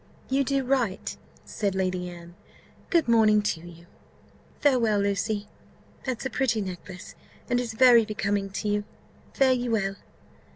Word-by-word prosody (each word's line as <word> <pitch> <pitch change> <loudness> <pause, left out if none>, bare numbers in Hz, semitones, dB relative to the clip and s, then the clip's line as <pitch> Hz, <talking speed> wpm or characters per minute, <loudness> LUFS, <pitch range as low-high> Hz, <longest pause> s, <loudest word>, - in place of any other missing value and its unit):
"You 275 +1 +3
do 275 0 0
right," 245 -7 -1 0.3
said 200 -3 -2
Lady 185 -1 -1
Anne: 170 0 -11 0.6
"good 335 -6 +2
morning 215 -2 +4
to 180 - -1
you! 170 0 -13 0.7
Farewell, 240 -7 +3
Lucy! 205 +1 -1 0.6
That's 255 0 -3
a - - 0
pretty 240 -2 +1
necklace, 185 -1 -7 0.3
and 245 0 +1
is 240 -2 -3
very 240 -1 +7
becoming 205 -2 -2
to 195 +2 -4
you 205 0 0 0.5
fare 265 -1 +4
ye 245 -1 -2
well!" 195 -3 0
215 Hz, 140 wpm, -26 LUFS, 195-245 Hz, 0.7 s, very